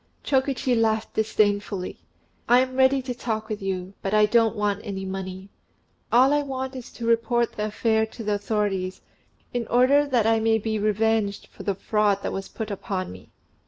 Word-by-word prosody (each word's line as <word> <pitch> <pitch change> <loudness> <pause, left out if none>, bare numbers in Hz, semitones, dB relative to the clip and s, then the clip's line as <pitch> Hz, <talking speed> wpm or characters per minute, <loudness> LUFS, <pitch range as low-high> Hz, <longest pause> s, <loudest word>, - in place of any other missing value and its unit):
Chokichi 265 -1 +1
laughed 220 -1 +1
disdainfully. 205 -3 0 0.5
"I 245 - +7
am 255 0 -2
ready 265 0 +4
to 250 -1 -3
talk 220 -3 -3
with 215 -1 -4
you; 190 -1 -3
but 195 +2 -1
I 210 0 +6
don't 225 +1 +3
want 205 -1 0
any 195 -3 -5
money. 190 0 -6 0.6
All 260 +4 +5
I 295 - +3
want 265 -1 -4
is 250 -2 -8
to 235 - -6
report 235 +1 +2
the 210 - -2
affair 220 +1 +1
to 225 +1 -9
the 210 0 0
authorities, 205 -2 -1 0.5
in 240 -2 -2
order 275 +4 +4
that 245 -6 +2
I 225 0 +3
may 225 0 +3
be 220 0 -2
revenged 215 -1 +1
for - - -13
the 200 - -1
fraud 205 0 +1
that - - -2
was 195 0 -4
put 220 -1 -5
upon 190 -1 -4
me." 95 0 -13
220 Hz, 185 wpm, -25 LUFS, 205-240 Hz, 0.6 s, I